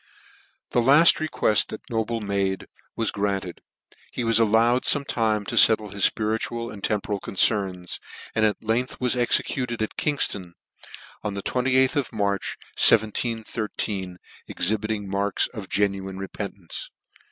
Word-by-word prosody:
The 120 Hz, -, +2 dB
laft 145 Hz, +7 st, +6 dB
requeft 150 Hz, -8 st, +2 dB
that 110 Hz, -, -10 dB
Noble 115 Hz, 0 st, -2 dB
made 100 Hz, -2 st, -2 dB, 0.3 s
was 115 Hz, -1 st, -1 dB
granted, 100 Hz, -3 st, -3 dB, 0.5 s
He 125 Hz, -, -4 dB
was 115 Hz, -1 st, +2 dB
allowed 115 Hz, +3 st, +3 dB
fome 145 Hz, -1 st, +2 dB
time 110 Hz, -5 st, 0 dB
to -, -, -4 dB
fettle 110 Hz, -2 st, +7 dB
his 100 Hz, -, +4 dB
fpiritual 115 Hz, +2 st, -3 dB
and 100 Hz, -, -12 dB
temporal 105 Hz, -1 st, -2 dB
concerns, 95 Hz, -3 st, -1 dB, 0.3 s
and 110 Hz, -, 0 dB
at 105 Hz, -1 st, 0 dB
length 115 Hz, +3 st, -1 dB
was 125 Hz, 0 st, +1 dB
exe 120 Hz, -1 st, +3 dB
cuted 120 Hz, -4 st, -4 dB
at 110 Hz, -, -6 dB
Kingfton 100 Hz, -11 st, -1 dB, 0.7 s
on 105 Hz, -1 st, -4 dB
the 100 Hz, -, -5 dB
28th 130 Hz, +2 st, +1 dB
of 140 Hz, -5 st, -1 dB
March, 100 Hz, -2 st, -2 dB, 0.2 s
171,3, 110 Hz, -3 st, +2 dB, 0.3 s
exhibiting 105 Hz, +2 st, -2 dB
marks 100 Hz, +1 st, 0 dB
of 105 Hz, -5 st, -9 dB
genuine 95 Hz, -2 st, -1 dB
repentance. 95 Hz, -2 st, -7 dB
110 Hz, 135 wpm, -24 LUFS, 100-115 Hz, 0.7 s, fettle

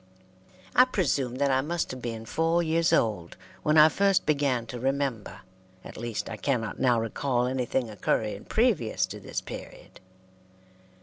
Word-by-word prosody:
I 250 Hz, -, +8 dB
presume 140 Hz, -, -1 dB
that 140 Hz, +1 st, +1 dB
I 130 Hz, 0 st, +3 dB
must 170 Hz, +4 st, -2 dB
have 130 Hz, -1 st, -7 dB
been 115 Hz, -2 st, -5 dB
four 165 Hz, +6 st, +1 dB
years 165 Hz, +1 st, +1 dB
old 105 Hz, -7 st, 0 dB, 0.2 s
when 150 Hz, +1 st, +2 dB
I 155 Hz, 0 st, +9 dB
first 195 Hz, +3 st, +2 dB
began 140 Hz, -5 st, +1 dB
to 120 Hz, +1 st, -7 dB
remember; 130 Hz, -7 st, -2 dB, 0.4 s
at -, -, -10 dB
least, 115 Hz, -1 st, -4 dB
I 115 Hz, -, -6 dB
cannot 115 Hz, -4 st, -2 dB
now 120 Hz, -3 st, +3 dB
recall 120 Hz, +2 st, -1 dB
anything 125 Hz, -1 st, -1 dB
occurring 105 Hz, 0 st, -2 dB
previous 220 Hz, -, +1 dB
to -, -, -9 dB
this -, -, -5 dB
period. -, -, -10 dB
130 Hz, 150 wpm, -27 LUFS, 115-155 Hz, 0.4 s, I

